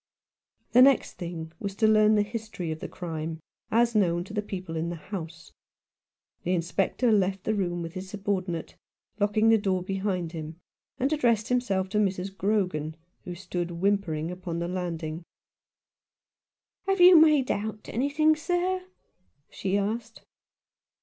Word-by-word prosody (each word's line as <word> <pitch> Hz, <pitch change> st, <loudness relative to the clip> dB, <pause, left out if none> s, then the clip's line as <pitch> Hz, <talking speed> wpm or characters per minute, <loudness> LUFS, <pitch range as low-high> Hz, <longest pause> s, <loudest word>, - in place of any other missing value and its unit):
The 250 Hz, -, +7 dB
next 270 Hz, 0 st, +4 dB
thing 170 Hz, -2 st, -5 dB
was 200 Hz, -2 st, -4 dB
to 220 Hz, +1 st, +3 dB
learn 215 Hz, 0 st, +5 dB
the 210 Hz, -, +3 dB
history 210 Hz, -6 st, -5 dB
of 155 Hz, -, -5 dB
the -, -, -5 dB
crime, 160 Hz, -2 st, -5 dB, 0.3 s
as 235 Hz, +1 st, +3 dB
known 175 Hz, -5 st, +2 dB
to 195 Hz, -, -11 dB
the 210 Hz, -, 0 dB
people 185 Hz, -5 st, -6 dB
in 165 Hz, +1 st, -2 dB
the 175 Hz, -, -4 dB
house. 160 Hz, -3 st, -8 dB, 0.9 s
The 180 Hz, +1 st, 0 dB
Inspector 195 Hz, +7 st, 0 dB
left 190 Hz, -2 st, +1 dB
the 215 Hz, -, 0 dB
room 175 Hz, -4 st, -1 dB
with 165 Hz, 0 st, -7 dB
his 185 Hz, 0 st, -7 dB
subordinate, 190 Hz, -4 st, -3 dB, 0.4 s
lock 205 Hz, +1 st, 0 dB
ing 220 Hz, +1 st, +5 dB
the 225 Hz, -1 st, +5 dB
door 190 Hz, -3 st, 0 dB
behind 190 Hz, -3 st, -2 dB
him, 160 Hz, 0 st, -7 dB, 0.4 s
and 270 Hz, +4 st, +1 dB
addressed 235 Hz, -7 st, +2 dB
himself 200 Hz, -7 st, +1 dB
to 210 Hz, -, 0 dB
Mrs. 195 Hz, -1 st, -1 dB
Grogan, 180 Hz, -7 st, 0 dB, 0.3 s
who 180 Hz, -2 st, -5 dB
stood 175 Hz, -1 st, -4 dB
whimpering 175 Hz, -3 st, 0 dB
upon 180 Hz, -2 st, -5 dB
the 170 Hz, -, -2 dB
Janding. 170 Hz, -3 st, -4 dB, 1.7 s
"Have 390 Hz, -1 st, +1 dB
you 355 Hz, 0 st, +9 dB
made 305 Hz, -5 st, +6 dB
out 215 Hz, +1 st, -4 dB
anything, 290 Hz, +5 st, +2 dB
sir?" 360 Hz, +4 st, -1 dB, 0.7 s
she 195 Hz, +1 st, -1 dB
asked. 220 Hz, +3 st, -3 dB
195 Hz, 150 wpm, -27 LUFS, 175-220 Hz, 1.7 s, you